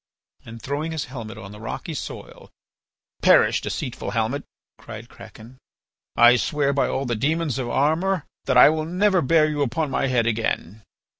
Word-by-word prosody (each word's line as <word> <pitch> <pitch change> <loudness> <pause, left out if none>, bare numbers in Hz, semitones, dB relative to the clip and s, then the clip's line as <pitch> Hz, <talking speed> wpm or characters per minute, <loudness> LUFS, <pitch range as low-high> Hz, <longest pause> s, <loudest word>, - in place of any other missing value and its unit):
And 115 +1 -10
throwing 145 +6 -4
his 155 -2 -3
helmet 115 -4 -7
on 100 -2 -10
the 105 - -11
rocky 115 - -6
soil: 145 - -8 0.7
"Perish, - - +4
deceitful - - -5
helmet!" - - -1 0.3
cried - - -10
Kraken. 120 +4 -14 0.6
"I 120 +1 +6
swear 140 +5 0
by 140 - +1
all 135 - -2
the 120 -2 -1
demons 150 +3 -1
of 125 -2 -3
Armor 160 +6 0 0.2
that 130 -2 +2
I 125 - +9
will 155 0 -1
never 185 +2 +2
bear 155 +2 +3
you 150 -1 -2
upon 140 +3 -1
my 135 - 0
head 125 -3 +1
again." 110 -3 -2
140 Hz, 165 wpm, -23 LUFS, 120-155 Hz, 0.7 s, I